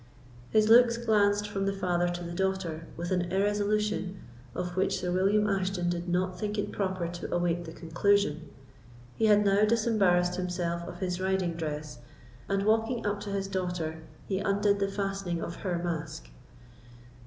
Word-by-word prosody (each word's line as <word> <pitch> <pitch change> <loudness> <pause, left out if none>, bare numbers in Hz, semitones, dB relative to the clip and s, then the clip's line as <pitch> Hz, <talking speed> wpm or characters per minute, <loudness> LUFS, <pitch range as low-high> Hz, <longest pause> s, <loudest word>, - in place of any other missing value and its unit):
His 215 -1 +3
looks 235 +1 +6
glanced 205 -3 +2
from 195 -1 -2
the 195 - +1
father 175 -2 0
to 175 0 -4
the 170 - -6
daughter 180 -3 -2
with 175 +2 -4
an 175 -1 0
irresolution 205 0 0 0.4
of 180 -1 -3
which 190 - +1
Sir 180 0 -2
William 200 +3 +3
Ashton 190 -3 0
did 175 0 -3
not 180 0 0
think 210 0 -2
it 205 - -2
proper 185 -3 -2
to 175 0 -6
await 175 0 0
the 160 - -7
conclusion. 165 -2 +1 0.7
He 220 - +2
had 210 -1 +5
now 200 +1 +4
disembarrassed 205 -6 +3
himself 175 -1 -2
of 175 +1 -9
his 180 -1 -2
riding 190 -2 0
dress, 150 -5 -5 0.5
and 195 0 +1
walking 225 +2 +1
up 205 0 0
to 205 - -6
his 195 -1 -2
daughter, 180 -4 -3 0.2
he 190 -1 -1
undid 200 0 +2
the 195 - +1
fastening 195 -3 -2
of 170 - -5
her 180 -3 -2
mask. 160 - -4
190 Hz, 165 wpm, -29 LUFS, 175-205 Hz, 0.7 s, looks